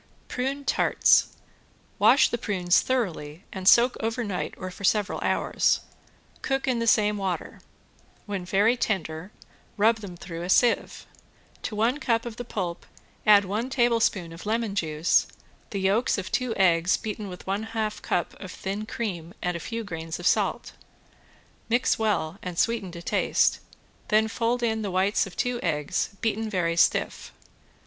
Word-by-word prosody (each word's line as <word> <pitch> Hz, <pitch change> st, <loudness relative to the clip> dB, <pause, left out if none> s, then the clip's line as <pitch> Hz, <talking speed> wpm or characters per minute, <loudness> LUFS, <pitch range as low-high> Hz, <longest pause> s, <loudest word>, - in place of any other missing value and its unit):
~PRUNE 275 Hz, +2 st, -3 dB
TARTS~ -, -, +4 dB, 0.7 s
Wash -, -, +6 dB
the 235 Hz, -, -2 dB
prunes 185 Hz, -5 st, +2 dB
thoroughly 180 Hz, -10 st, -2 dB
and 190 Hz, -1 st, -4 dB
soak 240 Hz, +3 st, +6 dB
over 230 Hz, +2 st, -2 dB
night 195 Hz, -4 st, -3 dB
or 185 Hz, 0 st, -6 dB
for 200 Hz, -, -11 dB
several 205 Hz, +1 st, +1 dB
hours. -, -, +1 dB, 0.6 s
Cook 270 Hz, 0 st, -1 dB
in 250 Hz, -2 st, +1 dB
the 230 Hz, -, -1 dB
same 210 Hz, -2 st, +3 dB
water. 190 Hz, -3 st, -4 dB, 0.6 s
When 200 Hz, -3 st, -4 dB
very 200 Hz, +6 st, +3 dB
tender 185 Hz, -6 st, -2 dB, 0.5 s
rub 220 Hz, +2 st, +4 dB
them 195 Hz, -5 st, -9 dB
through 170 Hz, -1 st, -7 dB
a 175 Hz, -, -5 dB
sieve. 240 Hz, +4 st, +2 dB, 0.6 s
To 215 Hz, -, -4 dB
one 235 Hz, +7 st, +1 dB
cup 230 Hz, -5 st, 0 dB
of 235 Hz, -1 st, -7 dB
the 245 Hz, -, -4 dB
pulp 180 Hz, -7 st, -4 dB, 0.4 s
add 205 Hz, -1 st, +7 dB
one 215 Hz, +7 st, -2 dB
tablespoon 230 Hz, -9 st, +1 dB
of 165 Hz, +5 st, -10 dB
lemon 225 Hz, -1 st, 0 dB
juice, 160 Hz, -3 st, +2 dB, 0.4 s
the 200 Hz, -, -3 dB
yolks 200 Hz, +6 st, +2 dB
of 195 Hz, -, -5 dB
two 250 Hz, -3 st, -1 dB
eggs 175 Hz, -2 st, +3 dB
beaten 210 Hz, -2 st, -5 dB
with 180 Hz, -1 st, -10 dB
one 195 Hz, +2 st, -1 dB
half 220 Hz, -1 st, -3 dB
cup 175 Hz, -, -1 dB
of 190 Hz, -2 st, -8 dB
thin 200 Hz, +4 st, -5 dB
cream 185 Hz, -6 st, -4 dB
and 180 Hz, -1 st, -2 dB
a -, -, -3 dB
few 230 Hz, +5 st, -5 dB
grains 165 Hz, -4 st, -5 dB
of 175 Hz, -, -8 dB
salt. -, -, +1 dB, 1.0 s
Mix 240 Hz, +1 st, +2 dB
well 200 Hz, -5 st, 0 dB
and 180 Hz, -2 st, -6 dB
sweeten 225 Hz, -4 st, 0 dB
to 170 Hz, -1 st, -8 dB
taste, -, -, +2 dB, 0.5 s
then 220 Hz, -1 st, +3 dB
fold 235 Hz, +2 st, -1 dB
in 220 Hz, -1 st, 0 dB
the 205 Hz, -, -3 dB
whites 190 Hz, +3 st, +1 dB
of 185 Hz, -, -12 dB
two 245 Hz, -1 st, -1 dB
eggs 150 Hz, -4 st, -1 dB
beaten 225 Hz, -1 st, -1 dB
very 175 Hz, -4 st, 0 dB
stiff. 170 Hz, -, +1 dB
205 Hz, 160 wpm, -26 LUFS, 180-230 Hz, 1.0 s, add